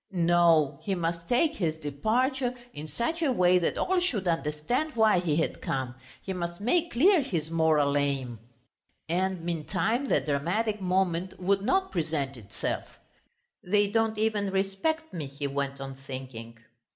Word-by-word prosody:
No, 170 Hz, -5 st, +3 dB
he 195 Hz, -, -1 dB
must 170 Hz, -1 st, -3 dB
take 300 Hz, +6 st, +3 dB
his 160 Hz, -4 st, 0 dB
departure 240 Hz, -, 0 dB, 0.2 s
in 150 Hz, +2 st, -7 dB
such 235 Hz, -, -2 dB
a 300 Hz, -5 st, +2 dB
way 180 Hz, -5 st, +4 dB
that 170 Hz, -, -1 dB
all 375 Hz, 0 st, +2 dB
should 225 Hz, -, 0 dB
understand 165 Hz, -, -1 dB
why 220 Hz, -5 st, +4 dB
he 165 Hz, -4 st, 0 dB
had 160 Hz, -, -1 dB
come, 130 Hz, -2 st, -2 dB, 0.3 s
he 190 Hz, -, -3 dB
must 175 Hz, -1 st, -4 dB
make 335 Hz, +11 st, +1 dB
clear 345 Hz, +7 st, +5 dB
his 165 Hz, -, -3 dB
moral 155 Hz, -3 st, +3 dB
aim.... 135 Hz, -5 st, -1 dB, 0.7 s
And 180 Hz, +1 st, -1 dB
meantime 175 Hz, -, -1 dB
the -, -, +3 dB
dramatic 185 Hz, +9 st, -1 dB
moment 185 Hz, -1 st, 0 dB
would 195 Hz, +2 st, +2 dB
not 380 Hz, -, +1 dB
present 155 Hz, -5 st, -2 dB
itself. 105 Hz, -5 st, -5 dB, 0.7 s
"They 205 Hz, +3 st, +3 dB
don't 225 Hz, 0 st, +1 dB
even 210 Hz, -2 st, +1 dB
respect 195 Hz, +13 st, -1 dB
me," 160 Hz, -5 st, -4 dB
he 140 Hz, +1 st, -6 dB
went 140 Hz, 0 st, -2 dB
on, 135 Hz, 0 st, -6 dB
thinking. 130 Hz, -4 st, -8 dB
175 Hz, 150 wpm, -28 LUFS, 150-220 Hz, 0.7 s, clear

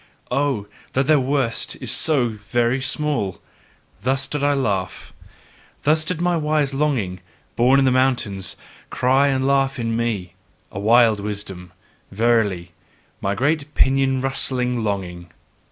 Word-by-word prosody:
Oh, 140 Hz, -7 st, 0 dB, 0.3 s
that 135 Hz, +1 st, +1 dB
their 155 Hz, +1 st, +4 dB
worst 130 Hz, -3 st, -1 dB
is -, -, -3 dB
so 140 Hz, -7 st, +2 dB
very 120 Hz, +4 st, -1 dB
small! 130 Hz, -, -1 dB, 0.6 s
Thus 135 Hz, +2 st, 0 dB
did 145 Hz, 0 st, -4 dB
I 145 Hz, 0 st, +3 dB
laugh. 100 Hz, -9 st, -2 dB, 0.7 s
Thus 155 Hz, +2 st, +3 dB
did 165 Hz, +1 st, -3 dB
my 175 Hz, 0 st, +1 dB
wise 150 Hz, -3 st, 0 dB
longing, 130 Hz, -11 st, -1 dB, 0.4 s
born 125 Hz, +3 st, +4 dB
in 135 Hz, -, +4 dB
the 130 Hz, -, +4 dB
mountains, 120 Hz, -7 st, 0 dB, 0.3 s
cry 135 Hz, +3 st, +2 dB
and 135 Hz, -1 st, 0 dB
laugh 135 Hz, 0 st, +2 dB
in 115 Hz, -2 st, -2 dB
me; 110 Hz, -7 st, -2 dB, 0.4 s
a 95 Hz, -, -6 dB
wild 110 Hz, 0 st, +4 dB
wisdom, 100 Hz, -3 st, -6 dB, 0.4 s
verily! 105 Hz, -5 st, +1 dB, 0.5 s
my 100 Hz, +1 st, -1 dB
great 145 Hz, +5 st, -1 dB
pinion 135 Hz, -1 st, +2 dB
rustling 125 Hz, -2 st, -1 dB
longing. 90 Hz, -4 st, -4 dB
125 Hz, 135 wpm, -21 LUFS, 105-140 Hz, 0.7 s, their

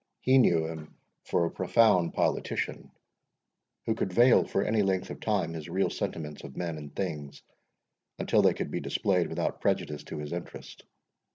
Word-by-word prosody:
He 130 Hz, +1 st, +5 dB
knew 85 Hz, -9 st, +4 dB
him 80 Hz, -1 st, -8 dB, 0.3 s
for 85 Hz, -, +1 dB
a 85 Hz, -, -2 dB
profound 95 Hz, -2 st, +3 dB
politician, -, -, -1 dB, 1.0 s
who 110 Hz, -, +1 dB
could 100 Hz, -3 st, -2 dB
veil 120 Hz, +6 st, +5 dB
for 100 Hz, -, 0 dB
any 110 Hz, 0 st, +1 dB
length 95 Hz, -2 st, 0 dB
of -, -, -7 dB
time 95 Hz, -7 st, 0 dB
his 80 Hz, 0 st, -7 dB
real 95 Hz, +3 st, 0 dB
sentiments 75 Hz, -2 st, -5 dB
of 70 Hz, -, -10 dB
men 85 Hz, -3 st, -3 dB
and 75 Hz, -1 st, -10 dB
things, 75 Hz, -7 st, -5 dB, 0.7 s
until -, -, +2 dB
they -, -, +4 dB
could -, -, -4 dB
be -, -, -2 dB
displayed 90 Hz, -3 st, 0 dB
without -, -, -3 dB
prejudice 75 Hz, -1 st, -1 dB
to -, -, -7 dB
his 75 Hz, +1 st, -5 dB
interest. 85 Hz, -, -8 dB
85 Hz, 170 wpm, -29 LUFS, 75-100 Hz, 1.0 s, He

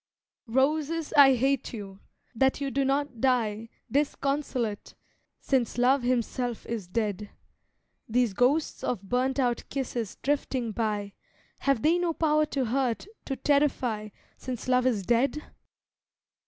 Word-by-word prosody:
Roses, 300 Hz, +6 st, 0 dB
I 275 Hz, -2 st, +8 dB
hate 270 Hz, +1 st, 0 dB
you! 200 Hz, -3 st, -8 dB, 0.3 s
that 265 Hz, +4 st, +2 dB
you 280 Hz, -1 st, -2 dB
do 275 Hz, +1 st, +1 dB
not 275 Hz, -3 st, -1 dB
die 230 Hz, -4 st, +1 dB, 0.2 s
Disconsolate, 275 Hz, -5 st, -1 dB, 0.4 s
since 250 Hz, -4 st, 0 dB
love 255 Hz, +3 st, +4 dB
himself 245 Hz, -1 st, -1 dB
is 225 Hz, -6 st, -4 dB
dead. 210 Hz, 0 st, -2 dB, 0.8 s
These 240 Hz, -2 st, +2 dB
ghosts 260 Hz, +9 st, +1 dB
of 220 Hz, -6 st, -2 dB
burnt 255 Hz, +6 st, 0 dB
out 245 Hz, -3 st, +1 dB
kisses 245 Hz, -6 st, -3 dB
drifting 265 Hz, -4 st, -1 dB
by, 210 Hz, -2 st, -2 dB, 0.5 s
Have 275 Hz, -5 st, +1 dB
they 335 Hz, +3 st, +4 dB
no 345 Hz, -2 st, 0 dB
power 305 Hz, -1 st, +2 dB
to 270 Hz, -3 st, -1 dB
hurt, 245 Hz, 0 st, 0 dB, 0.2 s
to 270 Hz, -, -2 dB
terrify, 260 Hz, -7 st, +1 dB, 0.3 s
Since 255 Hz, -2 st, -6 dB
love 255 Hz, 0 st, +3 dB
is 215 Hz, -6 st, 0 dB
dead? 260 Hz, +8 st, +1 dB
255 Hz, 125 wpm, -28 LUFS, 230-275 Hz, 0.8 s, I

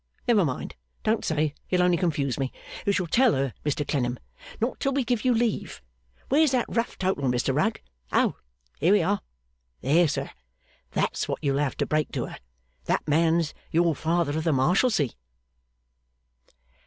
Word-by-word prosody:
Never 220 Hz, -5 st, +5 dB
mind. 130 Hz, -6 st, -3 dB, 0.3 s
Don't 220 Hz, 0 st, +1 dB
say. 155 Hz, -2 st, 0 dB, 0.2 s
You'll 180 Hz, -1 st, +3 dB
only 180 Hz, -1 st, +4 dB
confuse 145 Hz, -7 st, 0 dB
me. 135 Hz, -1 st, -1 dB, 0.4 s
You -, -, +5 dB
shall 185 Hz, -2 st, 0 dB
tell 240 Hz, +8 st, +4 dB
her, 135 Hz, -3 st, -1 dB
Mr 145 Hz, 0 st, -1 dB
Clennam. 125 Hz, -3 st, 0 dB, 0.4 s
Not 235 Hz, +3 st, -1 dB
till 275 Hz, -, 0 dB
we 275 Hz, 0 st, +1 dB
give 240 Hz, -1 st, -1 dB
you 255 Hz, -, +3 dB
leave. 230 Hz, -2 st, 0 dB, 0.5 s
Where's 300 Hz, +3 st, +4 dB
that 250 Hz, -2 st, +2 dB
rough 230 Hz, +1 st, -2 dB
total, 185 Hz, -7 st, 0 dB
Mr 125 Hz, +1 st, +1 dB
Rugg? 220 Hz, +10 st, +1 dB, 0.3 s
Oh! -, -, +2 dB, 0.4 s
Here 175 Hz, +6 st, +4 dB
we 205 Hz, -4 st, +4 dB
are! 200 Hz, +4 st, 0 dB, 0.6 s
There 165 Hz, +4 st, +4 dB
sir! 145 Hz, -, -3 dB, 0.6 s
That's -, -, 0 dB
what -, -, -2 dB
you'll 140 Hz, -1 st, +1 dB
have 145 Hz, -2 st, -1 dB
to -, -, 0 dB
break 155 Hz, -1 st, 0 dB
to -, -, -1 dB
her. -, -, -9 dB, 0.5 s
That -, -, 0 dB
man's 160 Hz, +1 st, +2 dB, 0.2 s
your 170 Hz, 0 st, +3 dB
Father 160 Hz, 0 st, 0 dB
of 160 Hz, -, -1 dB
the 165 Hz, -2 st, +2 dB
Marshalsea! 170 Hz, -, +3 dB
165 Hz, 165 wpm, -26 LUFS, 145-215 Hz, 0.6 s, Never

